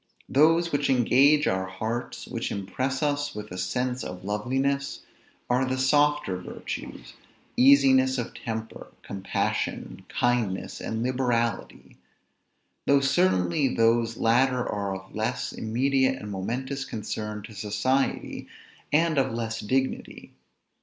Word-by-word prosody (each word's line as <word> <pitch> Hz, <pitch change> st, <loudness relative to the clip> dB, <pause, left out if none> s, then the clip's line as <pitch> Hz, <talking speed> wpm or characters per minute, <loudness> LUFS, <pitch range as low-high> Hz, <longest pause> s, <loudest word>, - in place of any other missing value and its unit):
Those 165 Hz, +4 st, +4 dB
which 145 Hz, 0 st, 0 dB
engage 135 Hz, +4 st, +4 dB
our 95 Hz, 0 st, 0 dB
hearts, 110 Hz, +6 st, -4 dB
which -, -, -4 dB
impress 130 Hz, +8 st, -2 dB
us 145 Hz, 0 st, -1 dB
with 105 Hz, 0 st, -7 dB
a 90 Hz, -, -6 dB
sense 125 Hz, +7 st, -1 dB
of 90 Hz, 0 st, -7 dB
loveliness, 135 Hz, +7 st, -1 dB, 0.5 s
are 125 Hz, +1 st, +2 dB
the 130 Hz, 0 st, -1 dB
softer 145 Hz, -5 st, +2 dB
virtues; -, -, -7 dB, 0.4 s
easiness 130 Hz, -1 st, +5 dB
of 120 Hz, -, -4 dB
temper, 110 Hz, -1 st, -6 dB, 0.2 s
compassion, 95 Hz, -1 st, -3 dB
kindness, 120 Hz, -6 st, -1 dB
and 110 Hz, +1 st, -3 dB
liberality; 125 Hz, -2 st, -1 dB, 0.9 s
though 140 Hz, 0 st, +5 dB
certainly 95 Hz, -, +2 dB
those 115 Hz, 0 st, +2 dB
latter 125 Hz, +2 st, +2 dB
are 100 Hz, -2 st, -2 dB
of 95 Hz, 0 st, -11 dB
less 110 Hz, +4 st, -2 dB
immediate 130 Hz, +3 st, +1 dB
and 105 Hz, -, -7 dB
momentous 130 Hz, +8 st, -3 dB
concern 105 Hz, -3 st, -5 dB
to 110 Hz, -, -10 dB
society, 105 Hz, +7 st, -1 dB, 0.4 s
and 160 Hz, 0 st, +3 dB
of 135 Hz, -, +1 dB
less 115 Hz, -1 st, -3 dB
dignity. 130 Hz, +5 st, -2 dB
125 Hz, 120 wpm, -26 LUFS, 105-135 Hz, 0.9 s, easiness